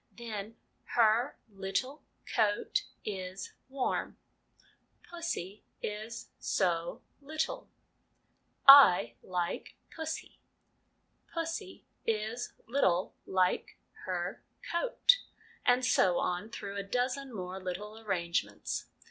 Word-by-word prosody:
Then, 220 Hz, -2 st, -5 dB, 0.2 s
' -, -, -43 dB
her 230 Hz, +3 st, +4 dB
little 205 Hz, +8 st, -3 dB, 0.3 s
coat 220 Hz, -, +2 dB, 0.2 s
is 190 Hz, -2 st, -5 dB, 0.2 s
warm/ 265 Hz, -1 st, -1 dB, 0.5 s
' -, -, -36 dB
Pussy 270 Hz, -, -4 dB, 0.2 s
is 215 Hz, +2 st, -5 dB
so 170 Hz, -3 st, 0 dB, 0.2 s
little/ 315 Hz, -, -3 dB, 0.6 s
' -, -, -37 dB, 0.2 s
I 120 Hz, -9 st, -3 dB
like 180 Hz, -2 st, -3 dB, 0.2 s
pussy/ 320 Hz, -1 st, -5 dB, 0.5 s
' -, -, -35 dB
Pussy 330 Hz, +4 st, -4 dB, 0.2 s
is 220 Hz, +2 st, -2 dB
little 190 Hz, -8 st, +2 dB
like 185 Hz, -1 st, +1 dB, 0.3 s
her -, -, -2 dB, 0.3 s
coat/ -, -, +4 dB, 0.5 s
and 250 Hz, +1 st, +5 dB
so 180 Hz, -7 st, +4 dB
on 180 Hz, +5 st, -1 dB
through 200 Hz, -3 st, -6 dB
a 200 Hz, -, -2 dB
dozen 250 Hz, +5 st, -1 dB
more 185 Hz, -3 st, -5 dB
little 205 Hz, +4 st, -5 dB
arrangements. 170 Hz, -, -2 dB
215 Hz, 100 wpm, -32 LUFS, 185-260 Hz, 0.6 s, and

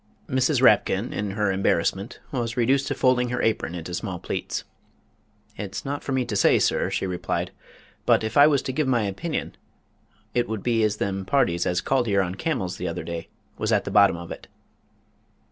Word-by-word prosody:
Mrs. 130 Hz, +1 st, +1 dB
Rapkin 105 Hz, -1 st, +4 dB
in 105 Hz, 0 st, -2 dB
her 105 Hz, -2 st, +2 dB
embarrassment 95 Hz, +2 st, 0 dB
was 120 Hz, -2 st, -2 dB
reduced 135 Hz, +3 st, +2 dB
to -, -, -1 dB
folding 125 Hz, -1 st, +2 dB
her 125 Hz, 0 st, -2 dB
apron 110 Hz, -6 st, 0 dB
into 90 Hz, +1 st, -6 dB
small 90 Hz, 0 st, -3 dB
pleats. -, -, -4 dB, 0.9 s
"It's 100 Hz, +4 st, -5 dB
not 140 Hz, +1 st, -3 dB
for -, -, -4 dB
me 130 Hz, -1 st, +1 dB
to 105 Hz, -, -4 dB
say, 95 Hz, -, +5 dB
sir," -, -, +1 dB
she -, -, -1 dB
replied, 90 Hz, -2 st, -2 dB, 0.6 s
"but, -, -, +4 dB
if 110 Hz, 0 st, -3 dB
I 145 Hz, +1 st, +8 dB
was 140 Hz, -3 st, +2 dB
to 130 Hz, -, -3 dB
give 150 Hz, +1 st, 0 dB
my 120 Hz, -4 st, +2 dB
opinion, 105 Hz, -, -3 dB, 0.8 s
it 120 Hz, -2 st, 0 dB
would 110 Hz, -3 st, -3 dB
be 115 Hz, -2 st, +2 dB
as 105 Hz, -1 st, +1 dB
them 95 Hz, -1 st, -2 dB
parties 95 Hz, -6 st, +1 dB
as 90 Hz, 0 st, +1 dB
called 130 Hz, -3 st, +1 dB
'ere 100 Hz, -2 st, +3 dB
on 90 Hz, -1 st, -3 dB
camels 95 Hz, -, -2 dB
the 90 Hz, -, -3 dB
other 85 Hz, +1 st, -4 dB
day 85 Hz, -1 st, -5 dB, 0.3 s
was -, -, 0 dB
at -, -, +3 dB
the -, -, -5 dB
bottom 100 Hz, -4 st, +5 dB
of 85 Hz, 0 st, -9 dB
it." -, -, -8 dB
110 Hz, 195 wpm, -25 LUFS, 95-130 Hz, 0.9 s, I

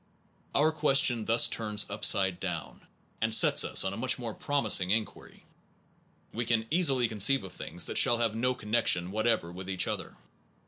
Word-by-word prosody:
Our 155 Hz, +3 st, +2 dB
question 135 Hz, -7 st, +2 dB
thus 115 Hz, +1 st, +4 dB
turns 105 Hz, -2 st, -1 dB
upside 95 Hz, -2 st, +1 dB
down, 85 Hz, -6 st, -7 dB, 0.3 s
and 110 Hz, 0 st, -1 dB
sets -, -, +4 dB
us -, -, +1 dB
on 95 Hz, 0 st, -4 dB
a -, -, -8 dB
much 130 Hz, +3 st, -1 dB
more 120 Hz, -4 st, -7 dB
promising 110 Hz, -11 st, 0 dB
inquiry. 110 Hz, +2 st, -4 dB, 0.9 s
We 120 Hz, -, -3 dB
can 115 Hz, -1 st, -1 dB
easily 140 Hz, -8 st, +2 dB
conceive 110 Hz, +3 st, +1 dB
of 95 Hz, -, -11 dB
things 85 Hz, +2 st, -6 dB
that -, -, +1 dB
shall 120 Hz, -3 st, +4 dB
have 115 Hz, -2 st, -1 dB
no 125 Hz, +3 st, -2 dB
connection 105 Hz, -6 st, 0 dB
whatever 110 Hz, -5 st, -2 dB
with 95 Hz, +2 st, -10 dB
each 95 Hz, -1 st, 0 dB
other. -, -, -6 dB
110 Hz, 170 wpm, -28 LUFS, 95-125 Hz, 0.9 s, thus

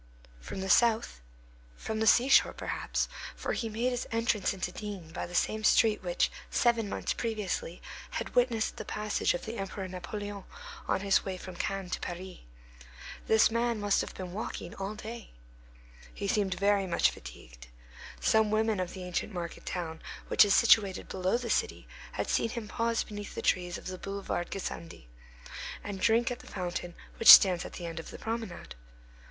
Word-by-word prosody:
From -, -, -6 dB
the 190 Hz, -, -3 dB
south; 220 Hz, -, +3 dB, 0.6 s
from 220 Hz, 0 st, -4 dB
the 220 Hz, -, +1 dB
seashore, 255 Hz, +5 st, +6 dB
perhaps, -, -, -2 dB, 0.3 s
for -, -, -3 dB
he 230 Hz, -, -2 dB
made 235 Hz, +4 st, 0 dB
his 245 Hz, -, -3 dB
entrance 230 Hz, -3 st, +1 dB
into 185 Hz, -2 st, -3 dB
D—— 205 Hz, +1 st, -5 dB, 0.2 s
by -, -, -4 dB
the 175 Hz, -, -8 dB
same 215 Hz, +3 st, +1 dB
street 215 Hz, 0 st, +4 dB
which, -, -, 0 dB, 0.2 s
seven 235 Hz, -3 st, +2 dB
months -, -, -2 dB
previously, 210 Hz, -6 st, -3 dB, 0.3 s
had -, -, -4 dB
witnessed 240 Hz, -3 st, +1 dB
the -, -, -5 dB
passage 210 Hz, -3 st, 0 dB
of -, -, -6 dB
the 225 Hz, +2 st, -5 dB
Emperor 195 Hz, 0 st, -4 dB
Napoleon 200 Hz, +2 st, -6 dB, 0.4 s
on -, -, +1 dB
his 195 Hz, -1 st, +3 dB
way 190 Hz, -1 st, -4 dB
from 185 Hz, 0 st, -9 dB
Cannes 195 Hz, 0 st, -3 dB
to -, -, -1 dB
Paris. 180 Hz, +1 st, -6 dB, 0.9 s
This 220 Hz, 0 st, +5 dB
man 235 Hz, -1 st, 0 dB
must 205 Hz, -1 st, +2 dB
have -, -, -7 dB
been 180 Hz, -2 st, -6 dB
walking 195 Hz, -4 st, -5 dB
all 195 Hz, +2 st, -5 dB
day. 225 Hz, +2 st, -8 dB, 0.8 s
He 200 Hz, -, -5 dB
seemed 195 Hz, -2 st, +1 dB
very 200 Hz, -1 st, +2 dB
much 170 Hz, -, +3 dB
fatigued. -, -, -12 dB, 0.5 s
Some 220 Hz, -1 st, +3 dB
women 215 Hz, -1 st, +1 dB
of 180 Hz, -1 st, -3 dB
the 185 Hz, -, -7 dB
ancient 180 Hz, +3 st, -3 dB
market 175 Hz, -3 st, -6 dB
town 160 Hz, -3 st, -4 dB, 0.3 s
which -, -, +7 dB
is 205 Hz, -1 st, +3 dB
situated 205 Hz, -5 st, +4 dB
below 185 Hz, +4 st, 0 dB
the 240 Hz, -1 st, -3 dB
city -, -, -1 dB, 0.3 s
had -, -, -2 dB
seen 230 Hz, -, +1 dB
him 225 Hz, -2 st, -5 dB
pause 230 Hz, +1 st, 0 dB
beneath 205 Hz, -1 st, -8 dB
the -, -, -4 dB
trees 180 Hz, -1 st, +1 dB
of -, -, -12 dB
the 185 Hz, 0 st, -5 dB
boulevard 195 Hz, -3 st, -3 dB
Gassendi, 170 Hz, -, -6 dB, 0.8 s
and 200 Hz, -2 st, -6 dB
drink 230 Hz, +2 st, +3 dB
at 245 Hz, -, -4 dB
the -, -, -14 dB
fountain 175 Hz, -2 st, -4 dB, 0.2 s
which 230 Hz, -, +10 dB
stands 185 Hz, -4 st, +9 dB
at -, -, -8 dB
the 175 Hz, -, -6 dB
end 165 Hz, -1 st, -5 dB
of 165 Hz, -, -8 dB
the -, -, -9 dB
promenade. 225 Hz, -5 st, -5 dB
200 Hz, 180 wpm, -30 LUFS, 185-225 Hz, 0.9 s, which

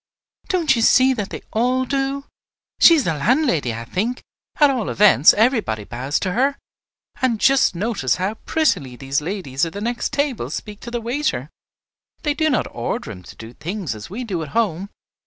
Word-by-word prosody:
"Don't 330 Hz, -7 st, +2 dB
you 230 Hz, -, 0 dB
see 260 Hz, +3 st, +5 dB
that 210 Hz, -6 st, -4 dB
they -, -, -7 dB
all 250 Hz, +3 st, +1 dB
do? 275 Hz, +1 st, -2 dB, 0.5 s
She 335 Hz, -, +8 dB
is 300 Hz, -, +2 dB
the 165 Hz, -, 0 dB
landlady, 170 Hz, -, +1 dB
I 115 Hz, +1 st, -6 dB
think; 220 Hz, -, -2 dB, 0.3 s
at 295 Hz, -2 st, +5 dB
all 245 Hz, -6 st, -2 dB
events, 195 Hz, -7 st, +6 dB
everybody 220 Hz, -, +1 dB
bows 125 Hz, +8 st, -3 dB
to 185 Hz, -, -1 dB
her. 270 Hz, +7 st, +1 dB, 0.6 s
And 245 Hz, -4 st, +1 dB
just 270 Hz, -7 st, +3 dB
notice 190 Hz, -, 0 dB
how 190 Hz, +3 st, -2 dB
prettily 220 Hz, -, -1 dB
these 135 Hz, +2 st, -2 dB
ladies 150 Hz, -6 st, -3 dB
at 165 Hz, -, -1 dB
the 200 Hz, -, -5 dB
next 235 Hz, +2 st, -2 dB
table 285 Hz, -3 st, -1 dB
speak 210 Hz, -1 st, -6 dB
to 235 Hz, -, -8 dB
the 240 Hz, 0 st, -3 dB
waiter. 265 Hz, +7 st, -2 dB, 0.7 s
They 295 Hz, -2 st, +1 dB
do 315 Hz, +1 st, +1 dB
not 260 Hz, -, +1 dB
order 115 Hz, -1 st, -4 dB
him 95 Hz, -4 st, -10 dB
to -, -, -13 dB
do 115 Hz, +1 st, -11 dB
things 175 Hz, -, -4 dB
as 105 Hz, -1 st, -9 dB
we 225 Hz, +7 st, -5 dB
do 190 Hz, -8 st, -3 dB
at 155 Hz, -, -6 dB
home. 195 Hz, -4 st, 0 dB
215 Hz, 190 wpm, -21 LUFS, -, 0.7 s, She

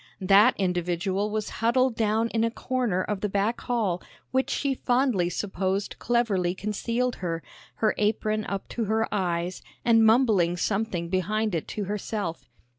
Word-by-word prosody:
That 200 Hz, +6 st, +6 dB
individual 185 Hz, +2 st, 0 dB
was 215 Hz, 0 st, -2 dB
huddled 245 Hz, +2 st, +3 dB
down 220 Hz, +1 st, +1 dB
in 225 Hz, 0 st, 0 dB
a 230 Hz, -, +2 dB
corner 235 Hz, -6 st, -1 dB
of 205 Hz, -1 st, -3 dB
the 210 Hz, -, 0 dB
back 205 Hz, +4 st, 0 dB
hall 210 Hz, -8 st, -1 dB, 0.3 s
which 260 Hz, +1 st, +1 dB
she 280 Hz, -2 st, 0 dB
fondly 245 Hz, -8 st, +1 dB
supposed 190 Hz, +1 st, -2 dB
cleverly 200 Hz, -7 st, +1 dB
concealed 230 Hz, +5 st, -2 dB
her, 165 Hz, -3 st, -3 dB, 0.3 s
her 215 Hz, -1 st, +2 dB
apron 215 Hz, 0 st, +1 dB
up 195 Hz, -1 st, -4 dB
to 230 Hz, -, -2 dB
her 220 Hz, +2 st, +1 dB
eyes, 180 Hz, -2 st, -1 dB, 0.2 s
and 225 Hz, -1 st, +5 dB
mumbling 220 Hz, -7 st, +4 dB
something 195 Hz, -3 st, -1 dB
behind 210 Hz, +3 st, 0 dB
it 165 Hz, -, -2 dB
to 210 Hz, -, -4 dB
herself. 200 Hz, -3 st, -4 dB
210 Hz, 150 wpm, -26 LUFS, 185-230 Hz, 0.3 s, That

